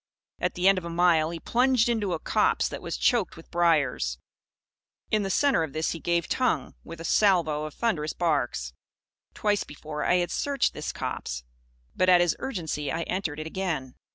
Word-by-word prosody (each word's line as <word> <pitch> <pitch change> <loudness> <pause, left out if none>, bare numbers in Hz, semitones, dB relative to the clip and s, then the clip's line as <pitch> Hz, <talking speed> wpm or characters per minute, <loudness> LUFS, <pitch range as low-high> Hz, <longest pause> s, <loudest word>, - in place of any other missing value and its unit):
At - - -1
the 180 +1 +2
end 195 -1 +5
of - - -14
a 170 - -5
mile, 170 -2 +3
he 170 0 -5
plunged 250 +3 +2
into 215 -6 0
a 165 - -2
copse - - +2
that - - -6
was - - -4
choked 235 -10 +1
with 165 - -14
briars. 145 - +2 0.9
In 215 - +3
the 195 - -2
centre 280 - +3
of 160 -4 -3
this 155 +1 -1
he 165 - -5
gave 170 0 0
tongue, 255 -1 0
with 165 0 -9
a - - -7
salvo 165 -6 +2
of 155 - -8
thunderous 155 -10 -1
barks. 125 - -1 0.6
Twice 205 -1 +1
before, 150 +1 -6
I - - +3
had 175 -1 0
searched 280 -2 0
this 150 - -4
copse. - - -4 0.5
But, 185 - +3
at 180 -1 +7
his 175 -2 +2
urgency, 160 - -3
I 165 +3 -1
entered 165 -6 -3
it 155 - -5
again. 160 -7 -3
170 Hz, 190 wpm, -27 LUFS, 155-195 Hz, 0.9 s, at